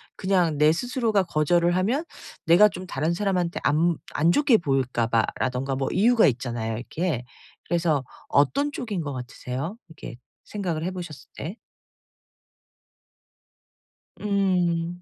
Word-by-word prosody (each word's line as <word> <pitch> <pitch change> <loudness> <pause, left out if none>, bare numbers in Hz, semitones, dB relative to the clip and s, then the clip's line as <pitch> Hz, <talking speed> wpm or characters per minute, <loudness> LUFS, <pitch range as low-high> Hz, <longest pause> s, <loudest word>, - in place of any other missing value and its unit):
그냥 180 -5 +1
내 150 +1 +5
스스로가 230 - 0
거절을 170 +2 +2
하면 235 - +1 0.4
내가 180 +6 +7
좀 185 -2 -8
다른 155 +2 -1
사람한테 180 -2 -1
안 160 +3 +2 0.2
안좋게 220 - +4
보일까 130 - 0
봐라든가 125 +3 -1
뭐 135 0 -1
이유가 230 +4 +4
있잖아요, 115 -3 -2
이렇게. 140 +2 -3 0.4
그래서 165 -5 +1 0.2
어떤 275 - +2
쪽인 220 -10 -4
것 145 -2 -4
같으세요? 130 - -5
이렇게 160 -7 -10 0.3
생각을 175 -6 -3
해 180 - -2
보셨을 175 -5 -8
때? 175 +10 -6 2.6
음. 180 -4 0
170 Hz, 270 characters per minute, -25 LUFS, 140-190 Hz, 2.6 s, 내가